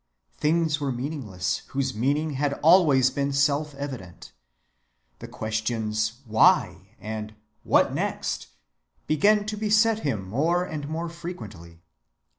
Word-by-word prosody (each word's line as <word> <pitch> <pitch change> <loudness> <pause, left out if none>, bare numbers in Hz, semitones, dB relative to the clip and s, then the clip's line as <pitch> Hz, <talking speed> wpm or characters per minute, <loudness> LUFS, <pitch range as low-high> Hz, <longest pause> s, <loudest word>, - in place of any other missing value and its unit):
Things 155 0 +1
were 140 -2 -1
meaningless 120 - -3
whose 135 -1 -2
meaning 145 +8 0
had 140 +1 -1
always 150 -7 +5
been 140 +1 -1
self‐evident. 140 - -2 0.9
The - - -8
questions 110 0 -2
"Why?" 110 -1 +2
and 110 0 -6 0.3
"What - - +3
next?" - - -2 0.6
began 205 +7 +3
to 215 0 -3
beset 215 +1 +3
him 110 - -3
more 160 - +1
and 150 -4 -6
more 165 +2 -3
frequently. 105 - -9
140 Hz, 110 wpm, -25 LUFS, 110-160 Hz, 0.9 s, always